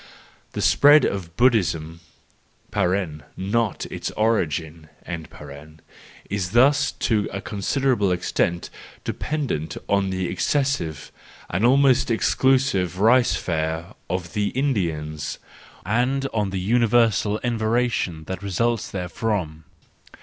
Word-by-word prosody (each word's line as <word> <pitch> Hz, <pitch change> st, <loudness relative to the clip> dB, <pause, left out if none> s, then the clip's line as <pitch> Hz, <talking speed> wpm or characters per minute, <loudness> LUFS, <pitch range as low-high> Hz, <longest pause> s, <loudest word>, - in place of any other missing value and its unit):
The -, -, -2 dB
spread 145 Hz, +1 st, +6 dB
of 90 Hz, -4 st, -4 dB
Buddhism 85 Hz, -10 st, +2 dB, 0.7 s
(not 95 Hz, +3 st, -1 dB
its -, -, -4 dB
origin) 80 Hz, -7 st, -1 dB, 1.4 s
is 95 Hz, -3 st, -3 dB
thus 145 Hz, +4 st, +4 dB
to 105 Hz, -3 st, 0 dB
a 100 Hz, -, -4 dB
considerable 105 Hz, +1 st, 0 dB
extent 85 Hz, -1 st, -1 dB, 0.3 s
dependent 125 Hz, -, -3 dB
on 100 Hz, -1 st, +1 dB
the 95 Hz, -1 st, -2 dB
excessive 135 Hz, -, -1 dB, 0.4 s
and 85 Hz, +5 st, -1 dB
almost 135 Hz, +1 st, +4 dB
exclusive 115 Hz, -6 st, +1 dB
rice 120 Hz, +4 st, +4 dB
fare 80 Hz, 0 st, -3 dB, 0.2 s
of 85 Hz, -2 st, -3 dB
the 105 Hz, -1 st, 0 dB
Indians, 80 Hz, -, -2 dB, 0.5 s
and 125 Hz, +7 st, +1 dB
on 105 Hz, -3 st, 0 dB
the 95 Hz, 0 st, -3 dB
universal 110 Hz, -1 st, +2 dB
enervation 115 Hz, -7 st, 0 dB
that 95 Hz, +3 st, -6 dB
results 110 Hz, +3 st, -1 dB
therefrom. 90 Hz, -4 st, -3 dB
100 Hz, 100 wpm, -23 LUFS, 85-120 Hz, 1.4 s, spread